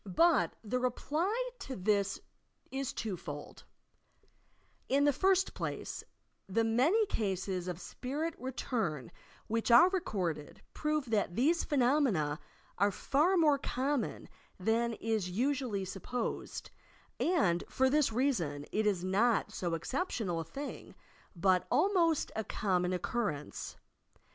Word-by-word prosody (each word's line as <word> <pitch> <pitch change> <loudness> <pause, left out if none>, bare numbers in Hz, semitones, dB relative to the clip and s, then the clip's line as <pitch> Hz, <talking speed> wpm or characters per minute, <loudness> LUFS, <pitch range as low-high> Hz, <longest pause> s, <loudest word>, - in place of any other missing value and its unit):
But 275 - +3
the 240 +4 -1
reply 335 - -1
to 265 - -6
this 200 0 +1 0.5
is 270 0 -2
two 215 -4 -3
fold: 145 -4 -8 1.2
In 280 +1 +3
the 290 0 +4
first 380 +5 +2
place, - - -4 0.5
the 225 +4 +2
many 270 - +3
cases 190 - -2
of 180 -1 -4
spirit 295 - -4
retum 225 - -2 0.3
which 230 +2 -1
are 245 +10 +8
recorded 180 - -3
prove 300 -5 -1
that 205 -5 +1
these 310 +9 +3
phenomena 245 - +2 0.4
are 200 +1 +4
far 300 - +2
more 300 -4 +4
common 265 -1 -2 0.3
than 230 +4 +1
is 220 -4 -1
usually 240 -1 0
sup 190 0 -7
posed, 245 -2 -4 0.5
and 195 - +2
for 265 - +2
this 285 -1 +3
reason 185 - 0
it 215 0 +1
is 190 -4 +1
not 205 +5 +2
so 175 -2 -2
exceptional 205 - -2
a - - -2
thing, 275 - -7 0.4
but 185 +1 +2
almost 335 +1 +2
a 220 - -1
common 180 -4 0
occurrence. 185 -4 -3
230 Hz, 125 wpm, -32 LUFS, 185-285 Hz, 1.2 s, are